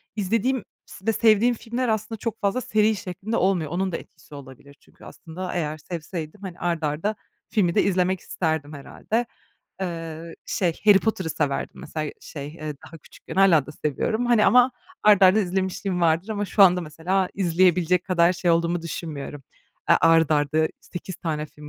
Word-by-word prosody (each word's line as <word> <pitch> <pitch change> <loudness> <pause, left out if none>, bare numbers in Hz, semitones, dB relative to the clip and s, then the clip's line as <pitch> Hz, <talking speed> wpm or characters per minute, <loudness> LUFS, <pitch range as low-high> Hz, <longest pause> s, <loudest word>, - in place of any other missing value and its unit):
izlediğim 225 +4 0 0.2
s 190 - -14
ve 225 - +2
sevdiğim 225 +2 +4
filmler 240 +3 -3
aslında 220 0 -2
çok 225 0 -4
fazla 200 +5 0
seri 215 -1 +2
şeklinde 195 +4 -4
olmuyor. 180 -6 +1
Onun 185 +2 -1
da 165 - -2
etkisi 150 - -15
olabilir 140 0 -13
çünkü - - -19
aslında 180 +3 -7
eğer 155 -3 -2
sevseydim, 165 +2 -7
hani, 185 -3 -8
art 170 -2 -1
arda 155 +9 -1 0.3
filmi 180 -6 +1
de - - +4
izlemek 185 -1 +1
isterdim 160 -5 -3
herhâlde. 215 - -3 0.6
Eee, 165 -2 -5
şey, 175 -4 -1
Harry 205 -2 +7
Potter'ı 190 -6 -2
severdim 145 -3 -2
mesela, 155 -1 -4
şey, 140 -2 -8
eee, 155 -1 -6
daha 165 - -12
küçükken. - - -12
Hâlâ 180 -7 +5
da - - -8
seviyorum. 220 - 0
Hani, 235 -3 +4
ama 250 +1 +6 0.3
art 205 -2 +6
arda 190 +3 +7
izlemişliğim 190 0 -2
vardır 170 +3 +2
ama 205 -2 -2
şu 200 +1 +3
anda 180 -2 +6
mesela 175 +4 -1
izleyebilecek 180 -1 +2
kadar 175 -1 +3
şey 175 -1 0
olduğumu 170 +1 +1
düşünmüyorum. 150 -4 -6 0.5
Eee, - - +8
art 165 -1 +4
arda 155 +1 +2
8 180 0 -8
tane 155 -2 -3
film 150 0 -13
180 Hz, 170 wpm, -24 LUFS, 160-200 Hz, 0.6 s, Eee